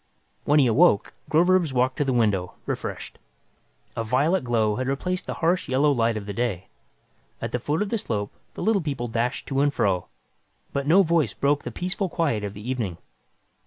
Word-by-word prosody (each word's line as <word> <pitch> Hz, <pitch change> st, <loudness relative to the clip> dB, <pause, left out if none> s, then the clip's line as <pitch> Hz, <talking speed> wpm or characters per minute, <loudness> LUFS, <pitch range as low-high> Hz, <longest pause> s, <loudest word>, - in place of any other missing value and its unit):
When 145 Hz, -, +4 dB
he 140 Hz, -, +5 dB
awoke, 110 Hz, -3 st, +4 dB, 0.2 s
Groverzb 175 Hz, -1 st, +3 dB
walked 130 Hz, +1 st, +1 dB
to 150 Hz, -, +2 dB
the 135 Hz, -, 0 dB
window, 105 Hz, -7 st, +1 dB
refreshed. -, -, -5 dB, 0.8 s
A 115 Hz, -, -2 dB
violet 140 Hz, +10 st, +1 dB
glow 110 Hz, -4 st, +1 dB
had 130 Hz, 0 st, -2 dB
replaced 180 Hz, +7 st, -2 dB
the -, -, -3 dB
harsh 170 Hz, -1 st, 0 dB
yellow 140 Hz, +3 st, +3 dB
light 115 Hz, -4 st, +1 dB
of 105 Hz, -, -6 dB
day. 100 Hz, -3 st, -3 dB, 0.7 s
At -, -, -4 dB
the 125 Hz, -, -1 dB
foot 150 Hz, -, 0 dB
of 205 Hz, -, -5 dB
the 230 Hz, -, 0 dB
slope, 105 Hz, -, -3 dB, 0.2 s
the -, -, -5 dB
Little 215 Hz, -3 st, +2 dB
People 135 Hz, -6 st, -3 dB
dashed 120 Hz, +3 st, -2 dB
to 135 Hz, -1 st, +1 dB
and 145 Hz, 0 st, +3 dB
fro, 95 Hz, -9 st, 0 dB, 0.7 s
but 140 Hz, 0 st, -2 dB
no 185 Hz, +6 st, +6 dB
voice 165 Hz, -3 st, +1 dB
broke 145 Hz, +1 st, +1 dB
the -, -, -6 dB
peaceful 185 Hz, +1 st, -3 dB
quiet 145 Hz, -12 st, 0 dB
of 100 Hz, 0 st, -5 dB
the 105 Hz, +3 st, -9 dB
evening. 115 Hz, -10 st, -2 dB
130 Hz, 190 wpm, -25 LUFS, 115-160 Hz, 0.8 s, no